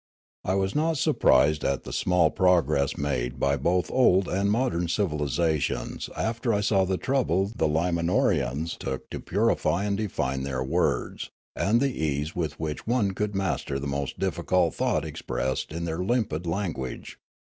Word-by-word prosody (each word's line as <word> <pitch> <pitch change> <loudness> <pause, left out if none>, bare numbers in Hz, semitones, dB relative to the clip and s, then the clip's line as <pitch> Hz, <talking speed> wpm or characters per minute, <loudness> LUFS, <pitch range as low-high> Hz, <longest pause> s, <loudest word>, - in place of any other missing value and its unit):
I 95 - 0
was 95 0 0
not 160 +1 +1
surprised 75 - +3
at 70 -1 0
the - - -7
small 90 -3 +3
progress 90 -6 +2
made 65 -3 -2
by 70 +2 +2
both 85 +5 0
old 95 -7 +4
and 100 +2 0
modern 105 -6 +1
civnlisations 75 - -1
after 115 +2 -1
I 105 - +1
saw 100 -2 +3
the 95 0 0
trouble 100 -8 0
the 80 - +1
Limanorans 85 -2 0
took 65 -1 -4
to - - -4
purify 85 +5 +1
and 100 -1 0
define 65 -11 -2
their 65 -1 -2
words, 65 - -1 0.3
and 115 +4 +2
the 135 -1 0
ease 75 +1 -1
with 80 -4 -3
which 80 +3 -4
one 115 -4 +2
could 105 +1 -3
master 95 -7 -1
the 70 - -5
most 70 -1 -3
difficult - - +1
thought - - 0
expressed 65 +2 -3
in 85 +2 -4
their 80 0 -3
limpid 90 -5 -1
language. 85 -8 -4
85 Hz, 155 wpm, -26 LUFS, 70-100 Hz, 0.3 s, old